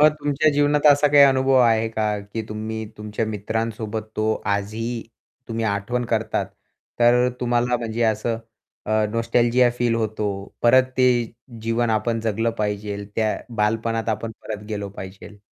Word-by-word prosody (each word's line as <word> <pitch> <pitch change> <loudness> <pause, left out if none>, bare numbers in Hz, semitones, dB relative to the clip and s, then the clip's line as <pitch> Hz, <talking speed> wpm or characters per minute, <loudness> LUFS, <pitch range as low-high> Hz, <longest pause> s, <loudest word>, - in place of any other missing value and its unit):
मग 150 - +8
तुमच्या 145 +1 +2
जीवनात 145 +1 +2
असा 145 0 +6
काही 145 0 +7
अनुभव 135 0 +3
आहे 115 -2 +3
का? 110 -2 -1
की 100 +3 -6
तुम्ही 110 +1 -4
तुमच्या 105 +1 -3
मित्रांसोबत 110 +1 -3
तो 110 0 +1 0.2
आजही 115 +4 -3 0.5
तुम्ही 115 0 -2
आठवण 110 +4 -1
करतात, 110 -1 -1 0.5
तर 120 +1 +5
तुम्हाला 120 0 +1
म्हणजे 115 0 -3
असं 110 +1 0 0.5
अ, 110 0 +2
नॉस्टॅल्जिया 120 +2 +3
फील 120 -1 +2
होतो. 110 -2 -1 0.4
परत 130 +2 +6
ते 130 0 +4 0.6
जीवन 115 +1 0
आपण 115 +1 0
जगलं 115 +1 0
पाहिजे, 105 -1 -3
त्या 110 -1 +1 0.2
बालपणात 115 +1 0
आपण 110 +1 -2
परत 105 -1 -6
गेलो 105 -2 -4
पाहिजे. 95 +2 -10
115 Hz, 145 wpm, -22 LUFS, 110-120 Hz, 0.6 s, मग